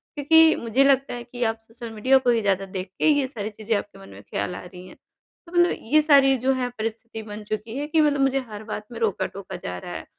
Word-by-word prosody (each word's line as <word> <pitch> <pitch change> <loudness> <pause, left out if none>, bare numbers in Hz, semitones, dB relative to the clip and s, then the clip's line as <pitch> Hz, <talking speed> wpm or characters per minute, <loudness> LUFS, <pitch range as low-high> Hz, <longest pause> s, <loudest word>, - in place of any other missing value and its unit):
क्योंकि 320 +2 +5
मुझे 235 +4 +1
लगता 275 -1 +2
है 240 -1 -6
कि 245 +1 -5
आप 225 -1 0
सोशल 225 +1 -10
मीडिया 255 +5 +4
को - - +6
ही 235 -1 +3
ज़्यादा 195 -2 0
देख 185 +1 -3
के - - +3
ये 290 -3 +3
सारी 215 -5 -5
चीज़ें 215 +1 -2
आपके 200 -1 -8
मन 195 - -13
में - - -12
ख्याल 180 - -4
आ - - -7
रहीं 180 +1 -11
है। - - -14 0.5
तो 335 - -15
मतलब 350 0 +3 0.2
ये 310 - +7
सारी 280 -3 +5
जो 260 +3 +1
है 255 -1 -1
परिस्थिति 225 +1 -5
बन 210 0 -8
चुकी 215 +2 -5
है 290 +1 -3
कि 315 +1 +3
मतलब 290 -2 +2
मुझे 270 0 +2
हर 210 0 -8
बात 215 -1 -6
में 235 - -7
रोका-टोका 200 -3 -3
जा 90 - -4
रहा 90 0 -8
है 80 -1 -7
230 Hz, 255 wpm, -24 LUFS, 210-270 Hz, 0.5 s, ये